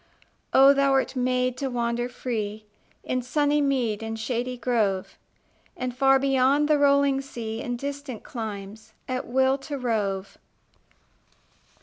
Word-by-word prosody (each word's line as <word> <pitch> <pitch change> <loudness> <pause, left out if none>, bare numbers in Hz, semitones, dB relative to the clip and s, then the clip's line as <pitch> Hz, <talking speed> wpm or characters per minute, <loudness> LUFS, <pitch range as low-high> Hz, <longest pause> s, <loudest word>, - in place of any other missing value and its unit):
Oh, 270 +1 +7
thou 275 0 +3
wert 270 0 +1
made 255 0 0
to 270 0 -2
wander 240 0 -1
free 215 -4 -4 0.4
In 255 0 -1
sunny 290 +3 +1
mead 250 -7 0
and 225 0 -5
shady 245 +2 -2
grove, 215 -7 0 0.6
And 250 -1 -3
far 270 +1 +5
beyond 270 +2 +3
the 300 -1 +3
rolling 280 -1 +3
sea, 230 -4 -6
In 245 0 -3
distant 280 -2 -6
climes, 220 -1 -7
at 255 0 -3
will 265 +2 +2
to 285 +1 -5
rove! 200 -6 -2
255 Hz, 130 wpm, -25 LUFS, 225-275 Hz, 0.6 s, Oh